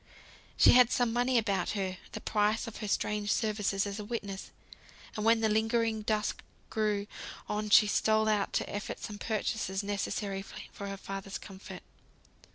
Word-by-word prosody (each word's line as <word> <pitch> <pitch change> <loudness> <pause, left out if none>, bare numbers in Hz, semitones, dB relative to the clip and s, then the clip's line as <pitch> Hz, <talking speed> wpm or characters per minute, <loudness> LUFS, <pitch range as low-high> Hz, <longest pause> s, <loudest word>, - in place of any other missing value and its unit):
She - - +8
had 250 -1 +7
some 245 -4 +2
money 245 +1 +2
about 205 -4 +1
her, 185 -1 -2
the - - -5
price 210 +2 +1
of 230 - -7
her 210 - -4
strange 210 +1 0
services 210 -3 +1
as 200 +1 -4
a - - -4
witness; 205 -3 -5 0.7
and 215 - -2
when 225 0 +4
the 220 - +3
lingering 225 +1 +1
dusk 210 0 -1 0.3
drew 210 -2 0 0.4
on, 210 0 -2
she 210 - +8
stole 220 +1 +2
out 210 -2 +1
to - - -1
effect 205 - -5
some 205 -1 -6
purchases 210 -2 -1
necessary 200 -1 -2 0.3
for 200 - -6
her 195 0 -5
father's 195 0 -6
comfort. 195 0 -10
210 Hz, 165 wpm, -31 LUFS, 200-220 Hz, 0.7 s, She